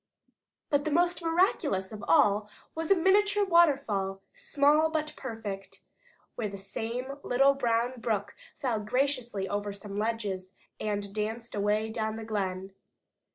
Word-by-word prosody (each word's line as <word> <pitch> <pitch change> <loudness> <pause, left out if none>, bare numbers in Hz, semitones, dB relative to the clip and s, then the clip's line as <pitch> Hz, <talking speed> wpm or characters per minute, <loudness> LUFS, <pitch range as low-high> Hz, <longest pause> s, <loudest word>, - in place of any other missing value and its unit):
But 290 +1 +1
most 345 +2 +2
miraculous 330 - +1
of 215 0 -8
all 210 -8 +4 0.2
was 320 0 -4
a 390 - +7
miniature 405 +3 +3
waterfall, 270 - +3
small 315 - +3
but 310 -1 -2
perfect, 215 -6 -6 0.5
where 215 -3 -3
the 200 - -7
same 235 +7 -5
little 275 +2 +4
brown 245 -1 0
brook 215 -3 -1 0.2
fell 245 -6 -1
gracefully 240 -3 -1
over 205 +1 -2
some 200 0 -6
ledges, 205 -4 -2 0.3
and 205 -1 -2
danced 220 +3 -3
away 210 +2 0
down 220 -1 -2
the 225 0 -6
glen. 190 -3 -3
230 Hz, 130 wpm, -29 LUFS, 205-290 Hz, 0.5 s, a